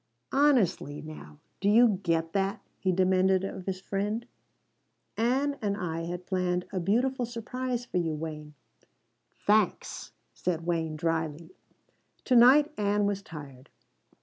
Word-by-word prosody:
"Honestly 245 Hz, -, +2 dB
now, 150 Hz, -, -10 dB, 0.2 s
do 200 Hz, -, +2 dB
you 220 Hz, -2 st, +5 dB
get 165 Hz, -3 st, 0 dB
that?" 195 Hz, 0 st, 0 dB, 0.2 s
he 190 Hz, -, +1 dB
demanded 185 Hz, +1 st, +3 dB
of 190 Hz, -1 st, -6 dB
his 185 Hz, -1 st, -2 dB
friend. 205 Hz, +4 st, -2 dB, 0.9 s
"Ann 270 Hz, +5 st, +1 dB
and 200 Hz, -2 st, -1 dB
I 165 Hz, -3 st, -3 dB
had 175 Hz, +1 st, -5 dB
planned 180 Hz, -1 st, -1 dB
a 190 Hz, -, 0 dB
beautiful 245 Hz, +8 st, +1 dB
surprise 245 Hz, +1 st, -4 dB
for 210 Hz, -, -3 dB
you, 165 Hz, -3 st, 0 dB
Wayne." 150 Hz, -1 st, -7 dB, 0.9 s
"Thanks," 210 Hz, -1 st, +1 dB, 0.2 s
said 170 Hz, -2 st, -2 dB
Wayne 165 Hz, -2 st, -1 dB
drily. 160 Hz, +1 st, -2 dB, 0.7 s
"To 255 Hz, -, +3 dB
night 280 Hz, +6 st, +7 dB
Ann 205 Hz, 0 st, +2 dB
was 200 Hz, -1 st, -1 dB
tired. 145 Hz, -8 st, -11 dB
190 Hz, 130 wpm, -28 LUFS, 165-225 Hz, 0.9 s, night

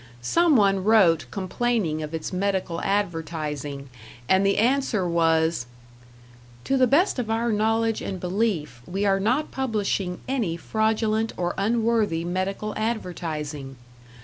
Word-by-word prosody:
Some 335 Hz, -, +3 dB
one 195 Hz, -4 st, +3 dB
wrote 180 Hz, -, +4 dB
complaining 190 Hz, -, -1 dB
of 155 Hz, 0 st, -5 dB
its 160 Hz, +2 st, -5 dB
medical 185 Hz, -3 st, -1 dB
advertising, 155 Hz, -7 st, -2 dB, 0.4 s
and 190 Hz, +1 st, +4 dB
the 195 Hz, 0 st, +2 dB
answer 235 Hz, -5 st, +1 dB
was: 165 Hz, -5 st, +1 dB, 1.0 s
To 270 Hz, -, 0 dB
the 260 Hz, -1 st, +4 dB
best 295 Hz, -, +3 dB
of 230 Hz, -3 st, -3 dB
our 230 Hz, +1 st, 0 dB
knowledge 225 Hz, +1 st, +1 dB
and 190 Hz, -2 st, -4 dB
belief, 175 Hz, -, -1 dB
we 195 Hz, +3 st, -2 dB
are 195 Hz, -1 st, +3 dB
not 250 Hz, +10 st, 0 dB
publishing 205 Hz, -7 st, -1 dB
any 230 Hz, -11 st, -1 dB
fraudulent 220 Hz, +3 st, 0 dB
or 175 Hz, -1 st, -1 dB
unworthy 220 Hz, -5 st, +1 dB
medical 190 Hz, +4 st, -2 dB
advertising.... 160 Hz, -, -4 dB
195 Hz, 125 wpm, -24 LUFS, 165-225 Hz, 1.0 s, wrote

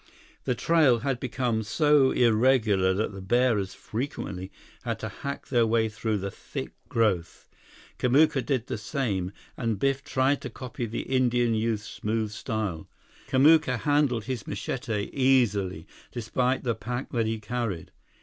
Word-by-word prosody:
The 125 Hz, -, +1 dB
trail 145 Hz, -6 st, +3 dB
had 135 Hz, -1 st, -1 dB
become 125 Hz, -3 st, -1 dB
so 145 Hz, +4 st, +4 dB
irregular 110 Hz, -6 st, +3 dB
that 105 Hz, +1 st, -1 dB
the 95 Hz, -, -7 dB
bearers 105 Hz, -2 st, +1 dB
frequently 100 Hz, -6 st, -5 dB, 0.3 s
had -, -, -3 dB
to -, -, -3 dB
hack 140 Hz, 0 st, -6 dB
their 120 Hz, -3 st, +3 dB
way 110 Hz, 0 st, +2 dB
through 110 Hz, 0 st, -2 dB
the 100 Hz, 0 st, -4 dB
thick -, -, -7 dB, 0.2 s
growth. 105 Hz, -7 st, 0 dB, 0.5 s
Kamuka 135 Hz, +1 st, +4 dB
did 130 Hz, -2 st, -1 dB
the 110 Hz, -, -4 dB
same, 100 Hz, -4 st, -2 dB, 0.2 s
and 115 Hz, -4 st, -1 dB
Biff 135 Hz, +4 st, 0 dB
tried 135 Hz, +2 st, +1 dB
to 125 Hz, -, -5 dB
copy 125 Hz, 0 st, -5 dB
the 115 Hz, -, -4 dB
Indian 120 Hz, -2 st, +2 dB
youth's 110 Hz, -1 st, -1 dB
smooth 110 Hz, 0 st, -2 dB
style. 105 Hz, -7 st, -3 dB, 0.4 s
Kamuka 140 Hz, -1 st, +5 dB
handled 145 Hz, -6 st, +2 dB
his 125 Hz, -2 st, -5 dB
machete 105 Hz, 0 st, -3 dB
easily, 105 Hz, -, +2 dB, 0.3 s
despite 125 Hz, +2 st, -1 dB
the 120 Hz, -3 st, +1 dB
pack 120 Hz, +4 st, -5 dB
that 115 Hz, -3 st, 0 dB
he 110 Hz, 0 st, -2 dB
carried. 110 Hz, -5 st, -3 dB
115 Hz, 145 wpm, -27 LUFS, 105-130 Hz, 0.5 s, Kamuka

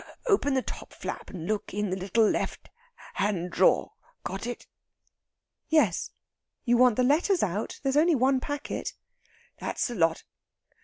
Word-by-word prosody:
Open 390 Hz, -, +2 dB
the 260 Hz, -, +1 dB
top -, -, -8 dB
flap, -, -, -6 dB
and 170 Hz, -4 st, -7 dB
look 210 Hz, -1 st, -3 dB
in 210 Hz, -2 st, -1 dB
the -, -, 0 dB
little 200 Hz, +4 st, +2 dB
left -, -, -2 dB, 0.4 s
hand 180 Hz, -4 st, -1 dB
drawer. -, -, +3 dB, 0.3 s
Got 195 Hz, +4 st, -4 dB
it?" 245 Hz, -, -6 dB, 1.0 s
"Yes; 320 Hz, -1 st, +2 dB, 0.6 s
you 240 Hz, -1 st, +4 dB
want 250 Hz, -2 st, +5 dB
the 250 Hz, -, +2 dB
letters 325 Hz, +8 st, +3 dB
out? 205 Hz, +2 st, -2 dB
There's 270 Hz, 0 st, +1 dB
only 325 Hz, +2 st, +5 dB
one 260 Hz, +1 st, +3 dB
packet." 290 Hz, +2 st, -4 dB, 0.6 s
"That's -, -, -2 dB
the 245 Hz, -, -3 dB
lot. 165 Hz, -6 st, +1 dB
240 Hz, 150 wpm, -28 LUFS, 200-285 Hz, 1.0 s, want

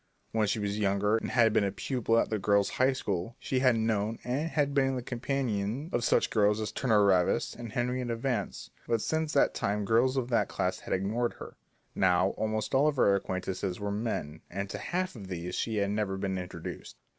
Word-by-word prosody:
When 110 Hz, -1 st, +1 dB
she 100 Hz, -, 0 dB
was 105 Hz, 0 st, -2 dB
younger 105 Hz, +1 st, +2 dB
and -, -, -4 dB
had 115 Hz, -4 st, +4 dB
been 110 Hz, -, +3 dB
a 100 Hz, -, 0 dB
pupil 115 Hz, +3 st, 0 dB
at -, -, +1 dB
the 110 Hz, -, 0 dB
Girls' 100 Hz, 0 st, +2 dB
High 130 Hz, +1 st, +3 dB
School, 100 Hz, -3 st, -3 dB
she 130 Hz, -, -1 dB
had 130 Hz, -2 st, +4 dB
known 110 Hz, -1 st, 0 dB
and 140 Hz, +6 st, -1 dB
had 145 Hz, -3 st, +1 dB
even -, -, -6 dB
been 135 Hz, -1 st, +2 dB
the 125 Hz, -, -4 dB
companion 125 Hz, -, -2 dB
of 120 Hz, -, +1 dB
such -, -, +2 dB
girls 105 Hz, -1 st, +3 dB
as 105 Hz, -1 st, -3 dB
Turner 110 Hz, -3 st, +3 dB
Ravis 90 Hz, -3 st, +2 dB
and 120 Hz, -2 st, -7 dB
Henrietta 125 Hz, 0 st, -1 dB
Vance, 115 Hz, -3 st, -3 dB, 0.2 s
but 115 Hz, -, +2 dB
since 160 Hz, +3 st, -1 dB
that 140 Hz, -, +3 dB
time 105 Hz, +1 st, -1 dB
girls 120 Hz, +5 st, +3 dB
of 125 Hz, -2 st, -1 dB
that 120 Hz, -, +2 dB
class -, -, -1 dB
had -, -, -4 dB
ignored 110 Hz, +6 st, -1 dB
her. -, -, -10 dB, 0.4 s
Now, 90 Hz, 0 st, +3 dB
almost 110 Hz, +3 st, -2 dB
all 135 Hz, +3 st, +4 dB
of 150 Hz, -, +1 dB
her 100 Hz, -6 st, +4 dB
acquaintances 95 Hz, -1 st, -2 dB
were 100 Hz, 0 st, -2 dB
men, 100 Hz, -8 st, -3 dB
and 100 Hz, +2 st, -4 dB
to -, -, -5 dB
half 185 Hz, -1 st, -2 dB
of 100 Hz, -4 st, -9 dB
these 90 Hz, -1 st, -5 dB
she 110 Hz, +3 st, -1 dB
had 100 Hz, -1 st, +1 dB
never 105 Hz, -2 st, -1 dB
been 95 Hz, -1 st, -2 dB
introduced. 90 Hz, 0 st, -7 dB
110 Hz, 215 wpm, -30 LUFS, 100-125 Hz, 0.4 s, had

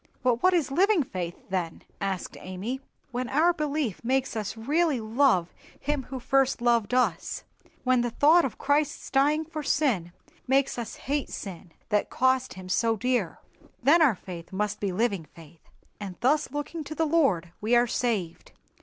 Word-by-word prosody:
"But 245 Hz, -2 st, +2 dB
what 370 Hz, 0 st, +4 dB
is 315 Hz, -6 st, +1 dB
living 375 Hz, +2 st, +3 dB
faith, 175 Hz, -7 st, -5 dB
then?" 175 Hz, -4 st, -2 dB, 0.2 s
asked 195 Hz, -2 st, -3 dB
Amy. 200 Hz, +9 st, -5 dB, 0.3 s
"When 250 Hz, 0 st, -3 dB
our 320 Hz, +6 st, +4 dB
belief 300 Hz, -, -2 dB
makes 260 Hz, +1 st, 0 dB
us 215 Hz, 0 st, -3 dB
really 295 Hz, +4 st, +1 dB
love 220 Hz, -5 st, +2 dB, 0.3 s
Him 285 Hz, -2 st, -2 dB
who 265 Hz, 0 st, -6 dB
first 270 Hz, +1 st, +2 dB
loved 240 Hz, -1 st, +2 dB
us,—when 255 Hz, 0 st, -1 dB
the 240 Hz, -, 0 dB
thought 310 Hz, +8 st, +5 dB
of 265 Hz, -, -3 dB
Christ's 290 Hz, +1 st, 0 dB
dying 295 Hz, +4 st, +3 dB
for 310 Hz, -1 st, -5 dB
sin 250 Hz, -, +1 dB, 0.4 s
makes 270 Hz, -1 st, +2 dB
us 235 Hz, -, -5 dB
hate 285 Hz, 0 st, -2 dB
sin, 185 Hz, -3 st, -7 dB, 0.2 s
that 210 Hz, -2 st, +1 dB
cost 260 Hz, -2 st, +1 dB
Him 185 Hz, 0 st, -9 dB
so 225 Hz, +4 st, +1 dB
dear, 240 Hz, -6 st, -1 dB, 0.4 s
then 310 Hz, +6 st, +6 dB
our 275 Hz, -9 st, +5 dB
faith 175 Hz, -2 st, -9 dB
must 205 Hz, +2 st, -2 dB
be 200 Hz, -2 st, -1 dB
living 200 Hz, -3 st, 0 dB
faith; 165 Hz, -1 st, -15 dB, 0.4 s
and 195 Hz, -3 st, -6 dB
thus 295 Hz, +5 st, +2 dB
looking 290 Hz, +3 st, -4 dB
to 310 Hz, -, -6 dB
the 325 Hz, -, +1 dB
Lord 270 Hz, -, +2 dB
we 225 Hz, +3 st, +2 dB
are 240 Hz, 0 st, +5 dB
saved." 220 Hz, -8 st, -2 dB
250 Hz, 165 wpm, -27 LUFS, 200-285 Hz, 0.4 s, then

